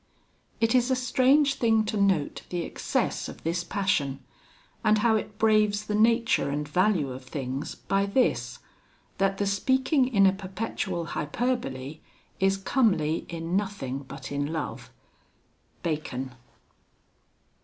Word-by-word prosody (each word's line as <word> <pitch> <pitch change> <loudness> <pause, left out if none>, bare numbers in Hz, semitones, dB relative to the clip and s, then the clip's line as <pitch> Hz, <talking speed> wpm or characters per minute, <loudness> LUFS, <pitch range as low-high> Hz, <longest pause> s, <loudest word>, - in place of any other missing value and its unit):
VI - - -39
It 225 - +1
is 250 0 +3
a 260 - +3
strange 265 +3 +3
thing 225 -2 +3
to 215 - -3
note 195 -7 +1
the 175 -1 -2
excess - - -2
of - - -11
this 170 +2 -1
passion; 160 -9 -1 0.6
and 215 -1 +4
how 220 +1 +3
it 210 -1 -3
braves 215 -1 +3
the 210 - -3
nature 230 - +3
and 145 +1 -2
value 180 -3 +2
of 130 +1 -8
things, 135 +1 -4
by 195 0 0
this 250 +6 +1 0.6
that 195 0 +2
the 205 - 0
speaking 260 +7 +2
in 200 -6 +4
a 190 - +5
perpetual 190 -2 -4
hyperbole 150 - -2 0.4
is 195 0 +3
comely 195 - +1
in 165 +1 -3
nothing 195 -10 -2
but 140 0 -9
in 145 +1 -2
love. 160 -2 -4 0.9
BACON. 135 -5 -3
195 Hz, 135 wpm, -27 LUFS, 155-220 Hz, 0.9 s, a